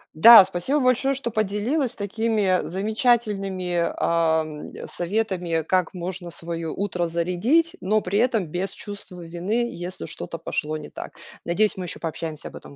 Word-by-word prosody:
Да, 225 +3 +10
спасибо 190 +11 0
большое, 255 +1 +2
что 265 -3 -3
поделилась 220 +6 0
такими 205 -2 +1
замечательными, 195 -4 0
ам, 160 -2 0 0.2
советами, 180 -3 -1
как 185 +1 +1
можно 175 -1 -5
свое 165 -1 -5
утро 180 -2 -2
зарядить, 180 - +1
но 210 +4 +2
при 200 +2 -1
этом 225 -7 +2
без 185 +5 -3
чувства 200 -3 -9
вины, 200 +9 -1
если 175 - -6
что-то - - -6
пошло 155 +1 -3
не 150 - -9
так. - - -9 0.3
Надеюсь, 205 +5 +1
мы 185 - -5
еще - - -7
пообщаемся 160 -1 -5
об - - -11
этом - - -11
185 Hz, 145 wpm, -24 LUFS, 170-220 Hz, 0.3 s, Да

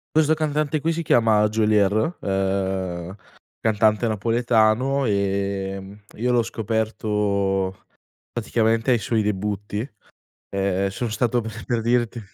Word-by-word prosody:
Questo 155 0 +4
cantante 155 -1 -1
qui 165 +3 +1
si 165 +1 -2
chiama 110 -6 +4
Geolier, 110 - +2
ehm, 95 -2 -2 0.5
cantante 110 +1 +2
napoletano, 115 +4 +2
ehm, 100 -1 -2
io 125 +3 0
l'ho 120 -1 +3
scoperto 105 -3 -1 0.5
praticamente 115 +1 +1
ai 120 - +3
suoi 110 +2 0
debutti. 105 0 -2 0.7
Ehm, 100 0 0
sono 115 +4 -4
stato 120 +3 +1
per 110 0 -7
per 120 -2 -1
dirti 120 0 0
110 Hz, 110 wpm, -23 LUFS, 100-120 Hz, 0.7 s, Questo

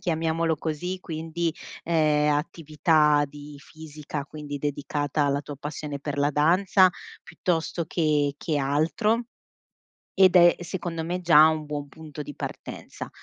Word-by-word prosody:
chiamiamolo 165 -2 0
così, 165 +4 -4
quindi, 165 0 -3 0.3
ehm, 155 -3 +2
attività 150 -1 +2
di 145 +1 -11
fisica, 150 -1 -8
quindi 150 -2 -7
dedicata 145 0 -2
alla 140 0 +1
tua 145 0 -9
passione 145 0 -6
per 145 0 -5
la 145 +1 +2
danza, 185 +6 +4 0.4
piuttosto 170 -1 -2
che 150 -4 +1
che 155 0 -2
altro; 165 - +1 1.0
ed 185 -1 +7
è, 175 -1 +7
secondo 170 -2 -4
me, 175 +2 -3
già 160 -3 +7
un 155 -1 0
buon 145 -1 -5
punto 150 0 -9
di 145 - -9
partenza. - - -7
155 Hz, 130 wpm, -25 LUFS, 145-165 Hz, 1.0 s, ed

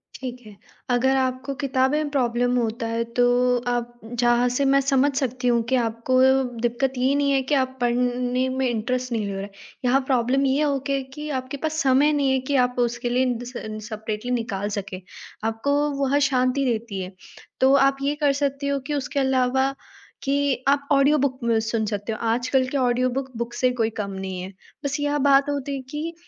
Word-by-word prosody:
ठीक 250 -2 -6
है, 210 -2 -12 0.3
अगर 255 +2 +3
आपको 260 +1 -1
किताबें 265 +1 +1
में 305 -1 -1
प्रॉब्लम 245 -2 +1
होता 230 -1 -1
है 230 0 -1 0.2
तो 245 - +6 0.5
आप 240 0 -2
जहाँ 240 +1 +2
से 260 +3 0
मैं 275 0 +4
समझ 275 +1 +2
सकती 255 -2 -1
हूँ 235 -1 +3
कि 260 - +3
आपको 235 +1 +1 0.4
दिक्कत 245 +3 0
ये 260 +2 +2
नहीं 285 -1 +2
है 270 - +3
कि 290 - +5
आप 260 -1 0
पढ़ने 245 +1 +1
में 260 0 0
इंटरेस्ट 250 +2 -2
नहीं 220 -3 -1
ले 200 - -3
रहे 195 0 -4
हैं 205 - -7 0.4
यहाँ 265 +3 +3
प्रॉब्लम 260 +1 +2
ये 270 +2 +2
हो 280 -2 +1
गया 275 0 +1
कि 300 +2 -6
आपके 255 +2 -7
पास 310 +2 -2
समय 275 +3 +4
नहीं 280 -2 +2
है 265 - +2
कि 280 - +2
आप 250 0 -5
उसके 240 0 0
लिए 250 +2 +2
इन 250 -2 0
द 245 - -8
सेन्स 215 -3 -7
सेपरेटली 215 +2 -4
निकाल 205 -4 -2
सकें 190 -1 -7 0.5
आपको 225 +6 -1 0.3
वह 275 +1 +2
शांति 255 +1 +1
देती 225 -5 -2
है। 185 +1 -6 0.5
तो 265 +1 +5
आप 275 0 +4
ये 285 +1 0
कर 295 -1 +2
सकते 280 0 -1
हो 280 0 0
कि 295 - -2
उसके 285 0 -2
अलावा 265 0 +2 0.5
कि 280 -1 0
आप 280 0 +2
ऑडियो 280 +2 +4
बुक 260 -2 0 0.2
सुन 220 -1 -1
सकते 205 +1 -3
हो 220 - -5
आजकल 255 +2 +1
के 280 - -2
ऑडियो 255 -1 +2
बुक 265 -1 -7
बुक 235 0 -4
से 250 +1 +1
कोई 230 -3 0
कम 200 -1 -5
नहीं 190 -1 -5
है। 190 +2 -8 0.3
बस 285 +2 -1
यह 290 0 0
बात 275 +1 +5
होती 280 -1 -2
है 270 - -5
कि 305 +4 -4
255 Hz, 205 wpm, -23 LUFS, 235-275 Hz, 0.5 s, तो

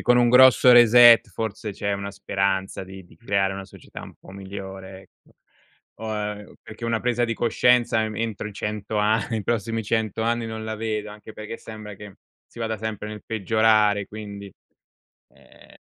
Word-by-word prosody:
forse - - -7
con 125 - +4
un 120 -1 +4
grosso 125 0 +7
reset 120 -1 +7
forse 105 +2 -5
c'è 100 +1 -3
una 100 0 -5
speranza 95 -1 -2
di 95 0 -11
di - - -21
creare 100 -4 0
una 95 0 -7
società 95 - -12
un - - -12
po' - - -17
migliore, 95 -1 -9
ecco. - - -25 0.7
O, 110 -1 -4
ehm, 105 -1 -5
perché 110 +2 -10
una 115 -1 -1
presa 120 0 0
di 115 -1 -2
coscienza, 120 0 +2
mhmm, 110 - -8
entro 110 -2 -3
i 105 - -8
100 105 +1 -3
a 105 +1 +1
i 110 -2 -1
prossimi 115 +1 -2
100 110 0 -2
anni 115 0 -1
non 110 0 -6
la 110 0 -4
vedo, 105 -1 -3
anche 105 +1 -12
perché 110 +2 -8
sembra 110 -1 -10
che 105 0 -12 0.3
si 120 - -13
vada 110 -1 -2
sempre 105 -1 -5
nel 105 0 -9
peggiorare, 110 -1 +2
quindi, 100 -2 -9 0.9
ehm - - -20
110 Hz, 180 wpm, -23 LUFS, 100-115 Hz, 0.9 s, grosso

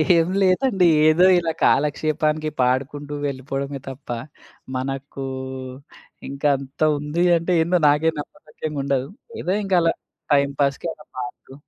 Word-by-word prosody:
ఏం 165 -1 +3
లేదండి. 190 0 +3 0.2
ఏదో 165 +4 +5
ఇలా 165 -1 -1
కాలక్షేపానికి 155 +1 +1
పాడుకుంటూ 140 +3 -1
వెళ్ళిపోవడమే 135 +1 -4
తప్ప 135 +1 -11 0.7
మనకు 135 +1 -4 1.0
ఇంకా 140 +2 -1
అంత 135 +1 -12 0.2
ఉంది 150 +4 -1
అంటే 170 +2 -2
ఏందో 175 +2 +2
నాకే 150 +3 +3
నమ్మసక్యంగుండదు. 145 -5 -4 0.3
ఏదో 185 - 0
ఇంకా 195 -2 +2
అలా 165 0 +2 0.4
టైమ్‌ 140 0 +3
పాస్‌కి 140 +4 0
అలా 150 - -17
పాడుతూ 125 +1 -7
145 Hz, 120 wpm, -22 LUFS, 135-165 Hz, 1.0 s, ఏదో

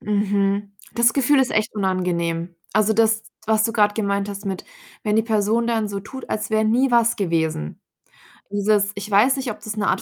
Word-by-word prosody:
Mhm. 200 -1 0 0.2
Das 235 -1 +4
Gefühl 275 +1 +3
ist 260 - +1
echt 215 +1 0
unangenehm. 175 -3 -1 0.2
Also, 215 +1 +3
das, 220 0 +2 0.2
was 220 -1 +2
du 225 - 0
grad 210 -2 +3
gemeint 200 -2 -1
hast 200 0 -7
mit, 190 -1 -4 0.4
wenn 210 0 0
die 225 - +4
Person 220 +1 +1
dann 225 -3 0
so 200 -1 -4
tut, 265 +6 -10
als 215 - -2
wär 220 0 +2
nie 245 +5 +2
was 235 -1 +3
gewesen. 160 - -2 0.7
Dieses 205 0 +2
ich 200 +1 -6
weiß 225 +7 +5
nicht, 260 -2 -3
ob 215 - -9
das 210 0 -5
'ne 205 - 0
Art - - +1
210 Hz, 200 wpm, -22 LUFS, 200-225 Hz, 0.7 s, weiß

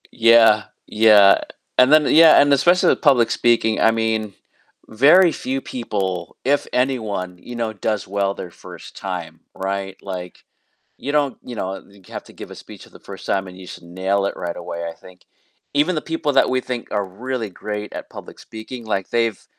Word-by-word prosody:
Yeah, 115 -2 +5 0.2
yeah, 105 -2 +5 0.4
and 130 +3 +5
then 155 -1 +6
yeah, 160 0 +7
and 145 0 +4
especially 175 +6 +3
with - - +1
public 130 -6 +3
speaking, 115 -2 +1
I 115 - +5
mean, 110 -2 -2 0.5
very 155 +10 +5
few 135 -1 -4
people 95 -9 -4
if 145 +2 +1
anyone 110 -9 -2
you 120 - -10
know, 115 -2 -3
does 105 0 -3
well 100 0 -1
their 90 - -8
first - - -13
time, 85 -4 -6 0.2
right? 95 0 -4
Like 90 -2 -8 0.5
you 145 - -5
don't, 145 -3 0
you 125 - -9
know, 95 -1 -5 0.3
have - - -8
to - - -16
give - - -11
a - - -9
speech - - -13
for - - -19
the - - -16
first - - -11
time 95 -1 -1
and 90 +1 -12
you 95 - -11
should 90 - -10
nail 95 +3 -2
it 100 - -3
right 85 -1 -5
away, 85 -1 -6
I 85 - -8
think 90 +1 -18 0.5
even 155 +5 +2
the - - 0
people 165 -3 -2
that 135 - +4
we 130 0 0
think 125 -2 -6
are 100 -1 0
really 115 +3 -5
great 105 +2 -6
at - - -8
public - - -12
speaking, 110 +1 -10
like 95 -3 -3
they've 115 -3 -1
110 Hz, 190 wpm, -20 LUFS, 95-130 Hz, 0.5 s, yeah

